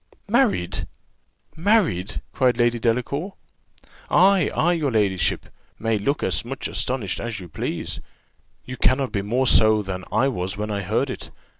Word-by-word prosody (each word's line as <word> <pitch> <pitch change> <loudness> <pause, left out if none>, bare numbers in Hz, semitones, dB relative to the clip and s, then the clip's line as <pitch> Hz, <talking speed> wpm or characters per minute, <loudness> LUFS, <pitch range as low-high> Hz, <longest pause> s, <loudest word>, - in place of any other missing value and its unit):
"Married! 215 - +1 0.7
married!" 165 - +1
cried 125 -3 +2
Lady 120 -1 +2
Delacour. 125 - -1 0.8
"Ay, 190 0 +5
ay, 175 +2 +2
your 155 -5 0
ladyship 100 -6 +1 0.3
may 110 -1 0
look 140 +8 -1
as - - 0
much 135 +3 -4
astonished 125 -7 -2
as 115 -3 -4
you 90 - -9
please, 80 - -4 0.7
you 125 0 -7
cannot 130 -2 +2
be 100 -3 -1
more 120 +6 0
so 110 -3 +4
than 95 -1 -5
I 135 - +3
was 95 -6 -3
when 105 +1 -3
I 100 -1 -2
heard 90 - 0
it. - - -8
120 Hz, 150 wpm, -23 LUFS, 100-140 Hz, 0.8 s, Ay